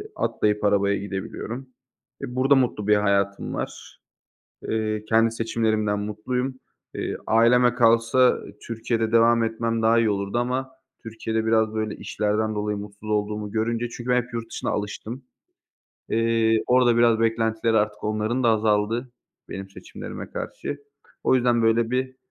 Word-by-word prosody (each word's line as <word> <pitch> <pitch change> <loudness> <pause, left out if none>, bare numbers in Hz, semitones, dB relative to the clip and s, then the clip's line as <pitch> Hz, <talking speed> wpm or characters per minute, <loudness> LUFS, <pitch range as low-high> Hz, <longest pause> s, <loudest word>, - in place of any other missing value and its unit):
atlayıp 105 0 0
arabaya 100 -1 +3
gidebiliyorum. 100 +6 -6 0.5
E, 125 - -6
burada 135 +2 +4
mutlu 120 -6 0
bir 105 - +5
hayatım 100 -1 0
var. - - -6 0.7
Iıı, 110 -1 -1
kendi 115 0 +4
seçimlerimden 110 -2 0
mutluyum. 125 +5 -3 0.4
Eee, - - -3
aileme 120 +2 +4
kalsa 115 +1 +4 0.3
Türkiye'de 115 -1 -1
devam 115 0 +4
etmem 115 0 -1
daha 115 +1 +4
iyi 115 -1 +2
olurdu 100 +1 -2
ama 130 +2 -1 0.3
Türkiye'de 110 0 -3
biraz 110 -1 +2
böyle 110 -1 -2
işlerden 110 +1 -1
dolayı 105 0 -2
mutsuz 105 +1 -9
olduğumu 105 0 -1
görünce 115 +2 -1
çünkü 120 +1 -8
ben 125 0 +4
hep 125 0 -15
yurt 115 -1 -4
dışına - - -3
alıştım. 110 +5 -5 0.9
Eee, 115 -1 +2
orada 125 -1 +4
biraz 115 -1 +4
beklentileri 115 0 +1
artık 105 0 -2
onların 110 +4 -1
da - - +5
azaldı 110 +3 +1 0.4
benim 95 0 -7
seçimlerime - - -9
karşı. 145 - -5 0.5
O - - +4
yüzden 120 -2 +3
böyle 115 +1 +2
bir, 130 +1 -2
115 Hz, 140 wpm, -24 LUFS, 105-120 Hz, 0.9 s, bir